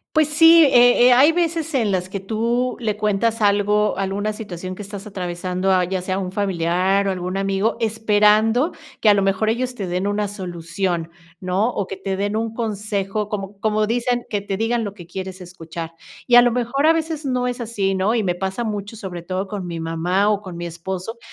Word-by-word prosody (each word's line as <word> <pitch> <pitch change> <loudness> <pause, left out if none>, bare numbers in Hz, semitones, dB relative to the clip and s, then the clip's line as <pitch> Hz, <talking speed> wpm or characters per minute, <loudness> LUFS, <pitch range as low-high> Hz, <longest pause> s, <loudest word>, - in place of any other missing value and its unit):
Pues 310 -1 +4
sí, 325 +2 +7
eh 245 -2 +6
eh, 250 - +6
hay 275 +6 +6
veces 330 -2 -1
en 220 -6 +1
las 185 -1 -1
que 200 +1 -4
tú 235 +5 -1
le 215 -3 -1
cuentas 215 +2 0
algo 205 0 +2
alguna 195 +2 -1
situación 185 -4 -7
que 210 - -13
estás 200 +1 -8
atravesando, 185 -1 -3
a 185 -1 +3
ya 185 +1 -2
sea 185 +1 -2
un 185 -1 -4
familiar 190 0 +1
o - - +1
algún 180 +1 -4
amigo, 195 +3 0
esperando 220 - +3 0.3
que 220 - +3
a - - +6
lo 200 - +2
mejor 195 +2 +1
ellos 250 +2 -2
te 200 -5 -4
den 180 +2 -2
una 205 +1 0
solución, 175 -2 -3 0.3
¿no? 185 +5 0
O 200 -5 -3
que 195 - -6
te 190 0 -3
den 205 +2 -1
un 225 0 -2
consejo 210 -2 -2
como 200 -1 -6
como 215 0 +1
dicen, 240 +1 0
que 205 - -1
te 195 -1 -4
digan 230 +2 0
lo 205 -2 -5
que 175 -5 -12
quieres 190 +1 -7
escuchar. 165 -2 -8 0.3
Y 245 - +3
a 245 - +10
lo 245 - +3
mejor 250 +5 0
a 325 - +7
veces 320 -2 -3
no 250 -1 0
es 245 0 -3
así, 205 -4 -1
¿no? 190 +4 +1
Y 230 - +1
me 180 -3 0
pasa 190 +6 -3
mucho, 210 0 -4
sobre 185 -5 -7
todo 185 +3 -3
con 195 -2 -5
mi 170 -1 -5
mamá 175 +5 0
o 205 - +1
con 185 -4 -9
mi 175 - -5
esposo, 185 +6 -6
205 Hz, 215 wpm, -21 LUFS, 185-230 Hz, 0.3 s, a